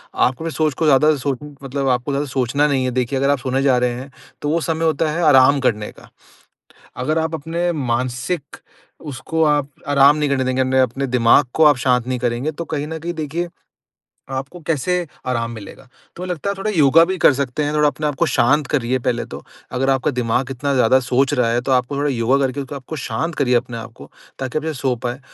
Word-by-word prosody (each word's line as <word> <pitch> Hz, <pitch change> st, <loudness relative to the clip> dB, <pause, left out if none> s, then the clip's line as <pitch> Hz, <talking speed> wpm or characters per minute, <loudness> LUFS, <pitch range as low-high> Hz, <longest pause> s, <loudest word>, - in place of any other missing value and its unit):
आपको 130 Hz, +4 st, +1 dB
ना 165 Hz, -, -2 dB
सोच 155 Hz, -2 st, 0 dB
को 160 Hz, +4 st, -2 dB
ज़्यादा 150 Hz, +2 st, +5 dB
सोच 135 Hz, -2 st, -2 dB, 0.2 s
मतलब 135 Hz, 0 st, -3 dB
आपको 125 Hz, +2 st, 0 dB
ज़्यादा 140 Hz, +1 st, -1 dB
सोचना 135 Hz, +2 st, +1 dB
नहीं 135 Hz, -3 st, 0 dB
है। 125 Hz, -, -1 dB
देखिए 125 Hz, +2 st, -1 dB
अगर 140 Hz, +1 st, +1 dB
आप 145 Hz, -2 st, +2 dB
सोने 130 Hz, +2 st, -1 dB
जा 135 Hz, -3 st, +4 dB
रहे 125 Hz, 0 st, +1 dB
हैं 135 Hz, +1 st, -10 dB, 0.3 s
तो 145 Hz, -, -2 dB
वो 165 Hz, +1 st, +1 dB
समय 165 Hz, 0 st, -1 dB
होता 155 Hz, 0 st, +1 dB
है 170 Hz, +2 st, -1 dB
आराम 135 Hz, +2 st, +6 dB
करने 105 Hz, -5 st, -1 dB
का। -, -, -17 dB, 0.9 s
अगर 155 Hz, +6 st, -1 dB
आप 160 Hz, 0 st, -1 dB
अपने 170 Hz, +3 st, -2 dB
मानसिक 130 Hz, +3 st, -3 dB, 0.4 s
उसको 150 Hz, +2 st, -3 dB
आप 145 Hz, -2 st, +2 dB, 0.2 s
आराम 145 Hz, +1 st, +5 dB
नहीं 150 Hz, -1 st, 0 dB
करने 135 Hz, -2 st, +1 dB
देंगे 130 Hz, 0 st, 0 dB
अ, -, -, +2 dB
ने 130 Hz, 0 st, +1 dB
अपने 130 Hz, +2 st, 0 dB
दिमाग 125 Hz, +2 st, +4 dB
को 160 Hz, -, +3 dB
आप 145 Hz, -3 st, +6 dB
शांत 125 Hz, -1 st, +1 dB
नहीं 130 Hz, -1 st, -2 dB
करेंगे 120 Hz, +5 st, -1 dB
तो 170 Hz, +2 st, -6 dB
कहीं 150 Hz, -2 st, -3 dB
न 160 Hz, 0 st, -5 dB
कहीं 170 Hz, +2 st, -4 dB
देखिए 160 Hz, +2 st, -3 dB, 0.9 s
आपको 135 Hz, +6 st, -5 dB
कैसे 165 Hz, +2 st, 0 dB, 0.3 s
आराम 115 Hz, -2 st, -1 dB
मिलेगा। 110 Hz, +3 st, -10 dB, 0.3 s
तुम्हें 180 Hz, +1 st, -6 dB
लगता 180 Hz, +3 st, -2 dB
है -, -, -2 dB
थोड़ा 215 Hz, +2 st, -1 dB
योगा 160 Hz, -2 st, +5 dB
भी 190 Hz, +2 st, -2 dB
कर -, -, +8 dB
सकते 140 Hz, +2 st, -2 dB
हैं 150 Hz, +1 st, -2 dB
थोड़ा 150 Hz, 0 st, +4 dB
अपने 150 Hz, +1 st, -3 dB
आप 145 Hz, -, -1 dB
को -, -, +2 dB
शांत 140 Hz, +5 st, +2 dB
करिए 130 Hz, -2 st, 0 dB
पहले 120 Hz, -1 st, -1 dB
तो। -, -, -9 dB, 0.3 s
अगर 135 Hz, +1 st, +1 dB
आपका 135 Hz, +2 st, +1 dB
दिमाग 125 Hz, +1 st, -1 dB
इतना 140 Hz, +2 st, -2 dB
ज़्यादा 130 Hz, +1 st, +4 dB
सोच 130 Hz, +2 st, +1 dB
रहा 120 Hz, -2 st, +1 dB
है 120 Hz, +1 st, +1 dB
तो 135 Hz, -, -1 dB
आपको 130 Hz, +2 st, +1 dB
थोड़ा 145 Hz, +1 st, 0 dB
योगा 125 Hz, +2 st, +1 dB
करके 135 Hz, +2 st, -4 dB
आपको 140 Hz, +3 st, -7 dB
शांत 140 Hz, +6 st, -3 dB
करिए 125 Hz, -3 st, +1 dB
अपने 120 Hz, 0 st, 0 dB
आपको 115 Hz, 0 st, -10 dB, 0.3 s
ताकि 130 Hz, +3 st, -2 dB
आप 155 Hz, -, -7 dB
सो 130 Hz, -1 st, -1 dB
पाए। 125 Hz, +2 st, -3 dB
135 Hz, 225 wpm, -20 LUFS, 125-150 Hz, 0.9 s, कर